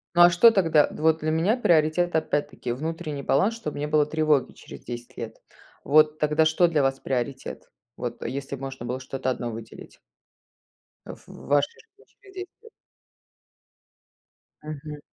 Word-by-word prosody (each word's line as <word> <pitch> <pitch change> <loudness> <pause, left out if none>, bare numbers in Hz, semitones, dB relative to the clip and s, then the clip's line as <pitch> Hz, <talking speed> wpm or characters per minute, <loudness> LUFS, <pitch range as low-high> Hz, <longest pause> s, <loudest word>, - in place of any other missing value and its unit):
Ну, 175 - +6
а 175 - +9
что 205 +7 +6
тогда? 165 -8 +3
Д - - -9
вот 160 0 +3
для 155 0 -1
меня 175 +9 +2
приоритет, 170 -3 +2
опять-таки, 145 -5 -1
внутренний 155 +2 -4
баланс, 195 +14 +2
чтобы 220 -11 -6
не 145 - -2
было 150 0 +3
тревоги 155 -2 +1
через - - -12
10 120 0 -8
лет. 115 -1 -6 0.5
Вот 155 +1 +4
тогда 150 +1 +2
что 160 +3 +4
для 160 -3 +1
вас 135 0 0
приоритет? 130 +1 -4 0.3
Вот, 120 -1 -5
а - - -4
если 140 +1 -4
можно 135 -2 -7
было 125 +2 -3
что-то 130 0 -4
1 120 -2 -3
выделить? 115 0 -11 1.1
А - - -7
ф - - -18
в - - -12
вашей 145 0 +1
жизни 420 -1 -26
через 390 -1 -20
10 370 0 -6
лет. 455 - -16 1.9
Мгм. 150 0 -7
150 Hz, 165 wpm, -25 LUFS, 135-165 Hz, 1.9 s, а